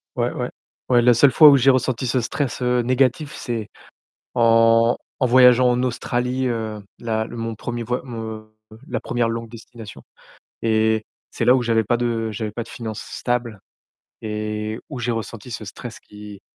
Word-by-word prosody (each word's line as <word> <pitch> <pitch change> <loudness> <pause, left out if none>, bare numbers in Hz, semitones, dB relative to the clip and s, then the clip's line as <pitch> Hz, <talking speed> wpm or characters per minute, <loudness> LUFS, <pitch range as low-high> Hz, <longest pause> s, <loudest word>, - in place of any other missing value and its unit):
Ouais, - - 0
ouais, - - -4 0.4
ouais, 120 -1 +5
la 120 +1 +5
seule 130 +4 +5
fois 150 +4 +8
où 140 - +6
j'ai 135 +2 +4
ressenti 130 -1 +1
ce 125 +2 +1
stress, 130 +3 -3
heu, 125 0 +2
négatif, 130 +4 +1
c'est 115 -4 -4 0.6
en 115 0 +4 0.2
en 130 - +2
voyageant 125 0 +6
en 125 0 0
Australie, 125 +1 -1
heu, 110 -3 -4 0.2
la 110 -1 -2
le 120 - -9
mon 115 -1 -4
1er, 120 +2 -5
voy 125 +2 -2
mon 110 -3 -7 0.4
la - - -2
1re 120 -1 -1
longue 115 0 -4
destination 115 -1 -11 0.6
et 110 -1 +2 0.3
c'est - - -2
là 125 - +6
où 125 - 0
j'avais 115 -1 +2
pas 120 +4 +1
de 115 -2 -1
j'avais 105 0 -4
pas 115 - -4
de 115 - -12
finances 110 -2 -6
stables 120 -3 -3 0.6
et 105 0 -4
où 135 -4 -6
j'ai 120 0 -1
ressenti 115 0 -5
ce 110 - -6
stress 115 +3 -9
qui, 105 -1 -12
115 Hz, 180 wpm, -21 LUFS, 110-125 Hz, 0.6 s, fois